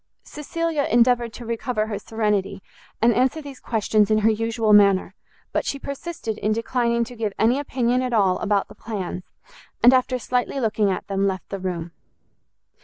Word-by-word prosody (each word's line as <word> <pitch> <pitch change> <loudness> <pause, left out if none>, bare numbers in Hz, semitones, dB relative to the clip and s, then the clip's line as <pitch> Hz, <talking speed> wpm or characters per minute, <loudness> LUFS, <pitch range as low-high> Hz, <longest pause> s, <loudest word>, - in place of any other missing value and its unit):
Cecilia 310 0 -2
endeavoured 240 0 +3
to 240 - -9
recover 230 -1 -2
her 210 -2 -4
serenity, 210 -3 -2 0.4
and 235 0 +5
answer 260 +6 +1
these 280 -3 -10
questions 215 -2 +1
in 215 - +3
her 225 - +6
usual 225 0 +1
manner; 200 -2 +5 0.4
but - - 0
she 280 - -3
persisted 280 -5 -5
in 215 +1 +1
declining 235 +1 0
to 245 +1 -8
give 215 -3 -2
any 240 +5 +3
opinion 250 -3 0
at 255 -1 -2
all 195 -5 +2
about 205 -2 0
the - - -13
plans, 195 -5 -5 0.6
and, 245 +2 +8
after 255 0 +2
slightly 250 +3 -1
looking 215 -4 +1
at 185 - -2
them, 195 0 0
left 190 -1 -4
the 195 - -4
room. 175 -2 -4
225 Hz, 175 wpm, -23 LUFS, 205-250 Hz, 0.6 s, and